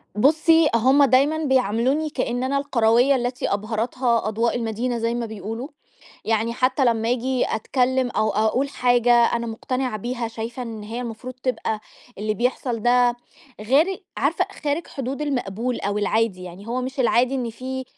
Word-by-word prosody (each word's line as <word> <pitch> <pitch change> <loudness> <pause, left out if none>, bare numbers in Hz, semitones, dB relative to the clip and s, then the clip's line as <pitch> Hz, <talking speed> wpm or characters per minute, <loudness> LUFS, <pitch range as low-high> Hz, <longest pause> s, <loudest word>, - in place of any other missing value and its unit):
بُصّي، 315 +6 +4
هُم 265 +5 +5
دايمًا 275 +4 +4
بيعاملوني 265 +3 +1
كأن 250 -2 -2
أنا 275 +2 0
القرويّة 245 -1 +3
التي 245 -3 -1
أبهرتها 230 +3 0
أضواء 230 +3 0
المدينة 235 +1 -2
زي 230 +1 -1
ما 240 -1 -2
بيقولوا، 220 +4 -6 0.6
يعني 225 +1 0
حتى 255 +2 +1
لمّا 230 -1 +1
آجي 255 +1 0
أتكلّم 255 +2 0
أو 215 0 +1
أقول 220 +7 +1
حاجة 245 -2 +2
أنا 235 0 +3
مقتنعة 250 +1 -3
بيها، 240 +1 -3
شايفة 230 +2 -6
إن 225 -3 -7
هي 225 +4 -5
المفروض 245 +2 -6
تبقى 220 -4 -2 0.4
اللي 215 +1 -1
بيحصل 240 0 -1
ده 245 0 +3 0.4
غيري 310 - +1
عارفة - - +1 0.2
خارج 295 +4 -1
حدود 275 +1 -5
المقبول 245 -4 -2
أو 205 +1 -1
العادي، 210 -3 0
يعني 180 +4 -10
هو 245 +2 -2
مش 260 +1 -4
العادي 250 +2 +3
إن 245 -3 -2
فيه 260 +3 -5
245 Hz, 155 wpm, -23 LUFS, 225-260 Hz, 0.6 s, هُم